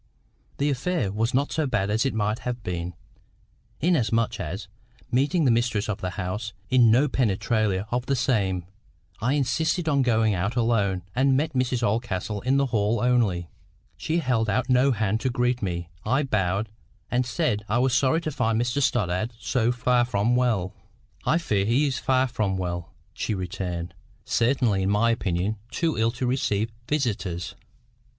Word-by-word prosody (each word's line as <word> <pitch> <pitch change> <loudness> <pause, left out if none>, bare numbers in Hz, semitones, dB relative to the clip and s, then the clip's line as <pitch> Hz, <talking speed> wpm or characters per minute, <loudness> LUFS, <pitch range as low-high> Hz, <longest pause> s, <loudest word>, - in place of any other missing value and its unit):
The 145 +1 +1
affair 140 - -1
was 110 +4 0
not 140 +3 +1
so 155 -2 0
bad 105 -5 0
as 110 +5 +2
it - - -2
might 105 +1 0
have 125 -2 -4
been, 90 -1 -4 0.9
inasmuch 115 -9 +1
as, 95 +3 -5 0.4
meeting 145 +6 +2
the 125 - +5
mistress 115 -3 +1
of 105 -3 -3
the 90 -1 -4
house 105 +3 -3 0.2
in 125 -3 +6
no 125 +7 +4
penetralia 110 -5 0
of 125 +1 -1
the 140 - +2
same, 100 -9 0 0.6
I 125 +4 +1
insisted 160 +4 0
on 140 -2 +3
going 110 -4 +2
out 95 +6 -1
alone, 105 -6 +1
and 130 +1 +3
met 155 +2 -1
Mrs 125 -1 0
Oldcastle 105 -2 -1
in 130 +2 +2
the 140 - +3
hall 110 -2 +1
only. 110 -9 +1 0.4
She 160 - -1
held 125 -8 +1
out 130 +5 0
no 130 +2 +4
hand 110 -2 0
to 130 - 0
greet 125 0 0
me. 85 -4 -3 0.2
I 130 +6 +1
bowed, 100 -4 0 0.4
and 125 +1 +2
said 125 -5 -1
I 115 - +2
was 130 +1 +2
sorry 140 +6 +3
to 155 - -3
find 115 -5 0
Mr 120 +4 0
Stoddart 110 -2 0
so 120 0 +1
far 125 0 +2
from 120 0 +1
well. 110 -7 +1 0.5
"I 160 - +4
fear 105 - 0
he 120 +8 +2
is 135 -2 -1
far 130 0 +2
from 110 -6 -1
well," 85 -2 -4 0.2
she 110 - -2
returned; 90 -2 -4 0.3
"certainly 115 -4 +2
in 95 - 0
my 110 +3 +3
opinion 100 -1 -1
too 165 -2 -1
ill 115 +1 +2
to 125 +1 -3
receive 115 -4 0 0.2
visitors." 105 - -1
115 Hz, 170 wpm, -25 LUFS, 100-130 Hz, 0.9 s, in